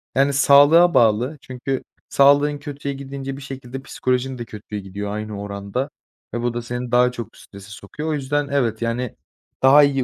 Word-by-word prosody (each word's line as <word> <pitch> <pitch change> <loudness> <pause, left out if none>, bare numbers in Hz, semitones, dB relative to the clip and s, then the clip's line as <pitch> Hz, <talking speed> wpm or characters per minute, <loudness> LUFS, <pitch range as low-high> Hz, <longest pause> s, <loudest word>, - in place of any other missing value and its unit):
Yani 140 +1 +3
sağlığa 145 +5 +6
bağlı 120 +6 +3
çünkü 130 +1 -4 0.3
sağlığın 145 +1 +4
kötüye 140 -1 -5
gidince 135 0 -6
bir - - -10
şekilde 135 -1 -7
psikolojin 130 0 -2
de 120 - -6
kötüye 105 -1 -7
gidiyor 100 +1 -6
aynı 105 -1 -5
oranda 100 +6 -4 0.4
ve 120 - -2
bu 120 0 -1
da 120 - -3
seni 120 +1 -5
daha 125 0 +4
çok 120 -2 -8
strese 100 0 -13
sokuyor. 105 +10 -7
O - - 0
yüzden 145 0 -1
evet, 120 -6 0
yani, 115 +1 -2 0.5
daha 140 +3 +8
iyi 135 -2 +2
130 Hz, 175 wpm, -21 LUFS, 115-140 Hz, 0.5 s, daha